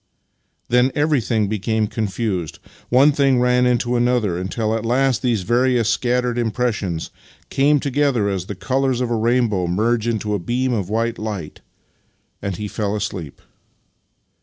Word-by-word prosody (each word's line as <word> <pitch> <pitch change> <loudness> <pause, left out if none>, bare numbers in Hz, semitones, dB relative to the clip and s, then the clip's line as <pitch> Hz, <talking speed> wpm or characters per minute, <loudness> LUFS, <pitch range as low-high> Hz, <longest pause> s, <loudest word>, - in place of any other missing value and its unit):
Then 125 +2 +3
everything 130 -8 +1
be 105 +1 -2
came 110 +2 0
confused. 100 -5 -3 0.3
One 135 +4 +5
thing 135 -3 +2
ran 125 0 +3
into 125 0 +1
another, 120 -6 +1
until 110 +5 -2
at 115 - -3
last 125 +1 +1
these 115 -7 0
various 120 +1 +2
scattered 125 -1 0
impressions 110 -7 -2 0.4
came 145 +2 +3
to 140 - -2
gether 135 -6 +1
as 95 -2 -2
the 105 - -5
colours 130 +6 0
of 125 -2 -1
a - - +2
rainbow 115 -5 +1
merge 110 +5 0
into 110 -2 -1
a 105 - 0
beam 125 +7 -1
of 100 -5 -2
white 115 +2 -1
light, 105 -8 -5 0.8
and 100 -2 -3
he 105 - -4
fell 105 0 -2
asleep. 95 -8 -5
115 Hz, 155 wpm, -20 LUFS, 105-125 Hz, 0.8 s, One